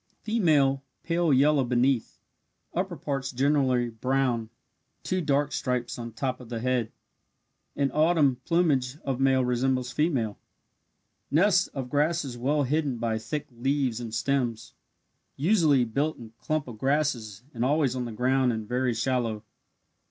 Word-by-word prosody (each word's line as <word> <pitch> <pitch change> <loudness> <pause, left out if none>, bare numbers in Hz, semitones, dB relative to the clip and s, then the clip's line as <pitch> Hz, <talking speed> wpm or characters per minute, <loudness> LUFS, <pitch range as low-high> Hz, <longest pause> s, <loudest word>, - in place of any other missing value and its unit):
Female 155 -11 +2 0.2
pale 170 -1 +1
yellow 140 +1 +4
beneath 125 0 +1 0.6
upper - - -2
parts 135 -1 -3
generally 130 -2 +1
brown 125 -1 0 0.5
two 185 0 -1
dark 145 -2 +1
stripes 125 -2 -2
on 115 0 -6
top 130 +3 -3
of 125 -3 -12
the 115 -2 -3
head. 125 -2 0 0.8
In 140 -1 0
autumn 155 -4 +3
plumage 145 -6 +1
of 135 -2 -2
male 135 -1 +3
resembles 125 0 0
female. 130 - 0 0.9
Nest 185 +4 +3
of 135 -2 -3
grasses 150 -2 0
well 140 +5 +1
hidden 140 -1 0
by 115 -1 -1
thick 150 +6 -4
leaves 130 0 -1
and 115 -2 -6
stems. 120 -1 -1 0.6
Usually 155 - +3
built 145 +7 -1
in 115 -2 -12
clump 155 -3 -2
of 115 -4 -9
grasses 130 -7 -1
and 120 -1 -2
always 140 -1 +2
on 125 -1 -2
the 120 - -5
ground 130 +3 +2
and 110 -2 -4
very 125 0 0
shallow. 115 -3 -1
130 Hz, 140 wpm, -27 LUFS, 120-145 Hz, 0.9 s, yellow